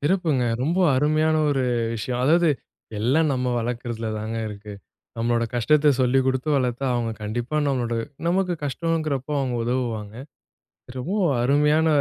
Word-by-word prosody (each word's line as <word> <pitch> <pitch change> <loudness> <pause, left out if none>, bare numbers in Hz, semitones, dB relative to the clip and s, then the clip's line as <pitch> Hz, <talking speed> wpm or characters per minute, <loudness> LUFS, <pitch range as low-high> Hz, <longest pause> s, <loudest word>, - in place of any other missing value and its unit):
சிறப்புங்க. 155 -5 +1 0.2
ரொம்ப 170 +6 0 0.2
அருமையான 155 +3 +2
ஒரு 135 -2 +1 0.3
விஷயம். 120 +2 -3
அதாவது 165 +4 +4 0.5
எல்லாம் 140 +8 +2
நம்ம 125 -1 -1
வளர்க்குறதில 120 -1 -3
தாங்க 110 +2 -4
இருக்கு. 105 0 -9 0.5
நம்மோட 115 0 +1
கஷ்டத்த 150 +5 +4
சொல்லி 130 +1 +3
குடுத்து 130 +2 -1
வளர்த்தா 130 0 -1
அவங்க 115 -2 -1
கண்டிப்பா 120 +7 -3
நம்மோட 120 -3 -1 0.3
நமக்கு 180 +1 +1
கஷ்டம்ங்குறப்போ 150 -1 -2
அவங்க 130 -3 -1
உதவுவாங்க. 115 -4 -2 0.8
ரொம்பவும் 175 +2 0
அருமையான 150 +4 +3
130 Hz, 125 wpm, -23 LUFS, 120-155 Hz, 0.8 s, அதாவது